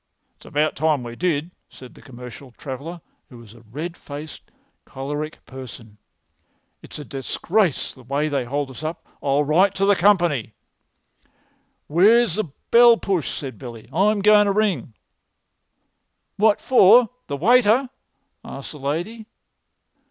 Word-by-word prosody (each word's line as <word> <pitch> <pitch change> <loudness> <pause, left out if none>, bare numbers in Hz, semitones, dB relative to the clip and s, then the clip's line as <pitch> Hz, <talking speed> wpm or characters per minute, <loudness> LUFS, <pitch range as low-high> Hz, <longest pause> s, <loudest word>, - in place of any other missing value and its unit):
"It's - - -18
about 150 +1 0
time 150 -3 0
we 120 0 -8
did," 165 +1 -1 0.2
said 130 -1 -14
the - - -17
commercial 125 0 -12
traveller, 145 +7 -8 0.3
who 125 - -13
was 115 -3 -14
a 120 - -17
red 150 +10 -7
faced, 150 0 -10 0.3
choleric 145 +3 -6
person. 120 -5 -11 0.8
"It's - - -11
a 150 - -8
disgrace 165 - -1
the 130 - -17
way 140 +5 -2
they 140 -3 -1
hold 140 +2 -3
us 130 - -10
up. 160 +1 -6 0.2
I'll 140 +1 +1
write 180 +7 +2
to 195 - +1
the 200 0 +4
company." 170 - +2 1.3
"Where's 210 +6 +4
the 215 +4 -1 0.3
bell 235 0 +7
push?" 180 - -2
said 135 -3 -6
Billy. 120 -4 -10
"I'm 205 +1 +2
goin' 210 0 +6
to 200 - +1
ring." 195 - -1 1.4
"What 210 0 +3
for—the 240 - +4
waiter?" 240 - +4 0.6
asked - - -9
the 150 - -11
lady. 175 +11 -4
155 Hz, 135 wpm, -22 LUFS, 135-200 Hz, 1.4 s, bell